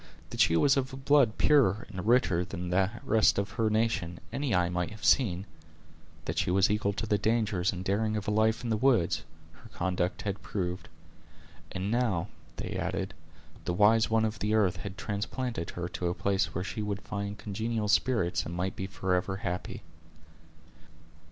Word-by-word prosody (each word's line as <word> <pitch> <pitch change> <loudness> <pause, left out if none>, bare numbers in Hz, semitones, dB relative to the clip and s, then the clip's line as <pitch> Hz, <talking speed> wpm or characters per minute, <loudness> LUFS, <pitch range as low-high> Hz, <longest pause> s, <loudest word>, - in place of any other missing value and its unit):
That - - -6
she 85 - +5
was 140 - +4
of 130 -1 -1
a - - -5
blood 135 -4 +3
purer 120 -9 +3
and 95 -1 -6
richer 115 -8 +3
than 90 0 -5
the 95 +1 +3
rest 110 -1 +3
of 100 0 -1
her 110 +2 0
nation, 105 -6 0
any 140 -6 0
eye 90 -1 +3
might 90 0 -2
have 110 0 -8
seen; 100 -7 +3 0.8
that - - -2
she - - 0
was 95 +2 +3
equal 105 -1 +1
to 110 - -3
the 105 -2 +1
dangers 105 -4 +1
and 95 0 -6
daring 110 +2 0
of 105 - -5
a - - +1
life 110 +2 +2
in 120 - -2
the 110 - +2
woods, 115 -7 +2 0.3
her - - -16
conduct 90 0 -1
had 100 -1 -3
proved; 90 -2 -4 0.8
and 95 +2 -3
now, 105 -6 0 0.3
they - - -5
added, 95 +1 -3 0.5
the 90 - -1
"wise 110 +3 +4
one 110 0 +3
of 110 0 -3
the 105 +1 +1
earth" 95 -5 +2
had 95 +2 -7
transplanted 105 +1 -3
her 85 -1 -4
to 90 - -3
a 85 - -1
place 100 -2 0
where 90 - -1
she 105 +3 -4
would 100 -1 -3
find 100 0 -4
congenial 110 +1 -2
spirits, 105 -4 +2
and 85 - -6
might 90 +2 -2
be 95 - -4
forever 95 0 -1
happy. 90 -2 -4
100 Hz, 185 wpm, -29 LUFS, 90-110 Hz, 0.8 s, she